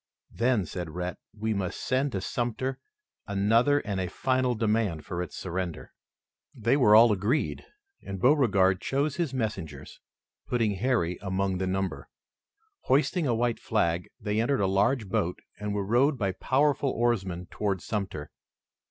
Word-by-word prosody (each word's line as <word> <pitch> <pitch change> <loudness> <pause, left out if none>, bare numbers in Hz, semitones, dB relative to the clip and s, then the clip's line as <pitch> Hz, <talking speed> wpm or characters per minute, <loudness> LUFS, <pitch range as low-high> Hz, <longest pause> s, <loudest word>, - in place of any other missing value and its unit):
"Then," 115 -5 +1
said 85 +1 -5
Rhett, 90 +2 -4
"we 110 +1 -2
must 95 -3 -3
send 135 +1 0
to 95 - -2
Sumter 120 +5 -2 0.5
another 115 +8 +3
and 100 -2 -3
a 90 - -2
final 130 +4 0
demand 110 -7 0
for 90 0 -3
its 90 -5 -6
surrender." 90 -2 -4 0.6
They 115 +4 +2
were 115 -7 +6
all 115 +1 +8
agreed, 105 +9 0 0.3
and 95 -1 -6
Beauregard 100 -8 +4
chose 140 +2 -1
his 170 -6 0
messengers, 100 - -4 0.5
putting 115 -3 +1
Harry 100 -4 0
among 95 -1 -1
the 95 - -1
number. 95 0 -2 0.8
Hoisting 150 +4 +2
a 120 - +2
white 120 0 0
flag, 85 -5 0
they 105 +1 0
entered 135 0 +1
a - - +3
large 105 +5 +2
boat 90 -1 -1 0.2
and 105 0 -3
were 100 -1 -1
rowed 130 +7 +3
by 100 -5 0
powerful 140 +7 +1
oarsmen 95 -8 0
toward 100 -3 -1
Sumter. 95 -8 -4
105 Hz, 150 wpm, -28 LUFS, 95-125 Hz, 0.8 s, all